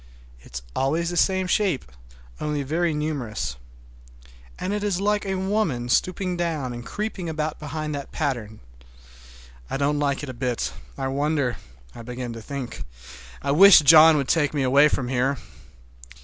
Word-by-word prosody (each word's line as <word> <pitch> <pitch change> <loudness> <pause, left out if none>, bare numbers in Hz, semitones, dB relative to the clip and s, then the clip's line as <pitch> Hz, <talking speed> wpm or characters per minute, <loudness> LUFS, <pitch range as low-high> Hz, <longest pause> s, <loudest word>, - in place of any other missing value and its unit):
It - - -16
is 65 - -3
always 160 +6 0
the - - -4
same 190 +2 +2
shape, 180 -5 0 0.5
only 150 -1 -2
very 165 +5 0
numerous. 145 - -3 1.0
And 195 - -3
it 210 0 -2
is 200 -3 0
like 205 0 0
a 190 - -1
woman 185 - -1
stooping 180 +6 0
down 155 -7 -2
and 120 0 -7
creeping 205 - -4
about 155 -1 -3
behind 150 0 -4
that 140 -1 -6
pattern. 120 -8 -3 1.1
I - - -2
don't 145 +1 +1
like 140 -1 0
it 145 - -5
a - - -5
bit. 125 -1 -2 0.2
I 135 -1 -2
wonder—I 125 - -3
begin 125 0 -6
to 115 - -8
think—I 65 - -7
wish 195 +6 +9
John 155 +1 +8
would 140 -2 -1
take 150 -3 +1
me 140 - +1
away 140 +3 +5
from 130 -3 -1
here! 130 +2 0
145 Hz, 155 wpm, -24 LUFS, 125-170 Hz, 1.1 s, wish